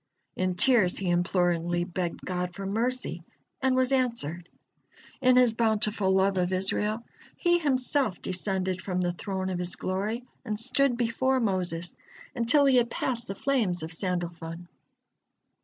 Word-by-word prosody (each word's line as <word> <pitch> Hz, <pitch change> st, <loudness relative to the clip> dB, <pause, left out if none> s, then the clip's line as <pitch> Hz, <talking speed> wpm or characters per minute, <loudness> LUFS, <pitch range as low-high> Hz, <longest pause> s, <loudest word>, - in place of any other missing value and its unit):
In 185 Hz, -1 st, -1 dB
tears 210 Hz, -3 st, +4 dB
he 185 Hz, -3 st, -1 dB
imploringly 175 Hz, -1 st, +1 dB
begged 175 Hz, -1 st, -4 dB
God 180 Hz, -1 st, -3 dB
for 195 Hz, -, -6 dB
mercy, 225 Hz, -3 st, -1 dB, 0.4 s
and 260 Hz, -1 st, +2 dB
was 255 Hz, 0 st, +2 dB
answered. 230 Hz, -, 0 dB, 0.7 s
In 255 Hz, 0 st, +5 dB
His 250 Hz, -3 st, +5 dB
bountiful 215 Hz, -3 st, +1 dB
love 190 Hz, 0 st, +2 dB
of 180 Hz, 0 st, 0 dB
Israel, 210 Hz, +4 st, 0 dB, 0.3 s
He 345 Hz, -1 st, +3 dB
Himself 260 Hz, -, 0 dB
descended 185 Hz, 0 st, -2 dB
from 185 Hz, -2 st, -2 dB
the 175 Hz, -1 st, 0 dB
Throne 190 Hz, -1 st, -3 dB
of 180 Hz, -, -3 dB
His 180 Hz, 0 st, -2 dB
glory 205 Hz, +6 st, -2 dB, 0.2 s
and 215 Hz, -4 st, -3 dB
stood 260 Hz, +1 st, +2 dB
before 255 Hz, +3 st, +1 dB
Moses, 180 Hz, -6 st, -2 dB, 0.4 s
until 250 Hz, +4 st, +3 dB
he 265 Hz, -2 st, +5 dB
had 240 Hz, -1 st, +3 dB
passed 240 Hz, -1 st, -1 dB
the 195 Hz, -, -4 dB
flames 215 Hz, -, 0 dB
of 160 Hz, -, -6 dB
Sandalfon. 175 Hz, -1 st, -4 dB
195 Hz, 145 wpm, -27 LUFS, 180-245 Hz, 0.7 s, In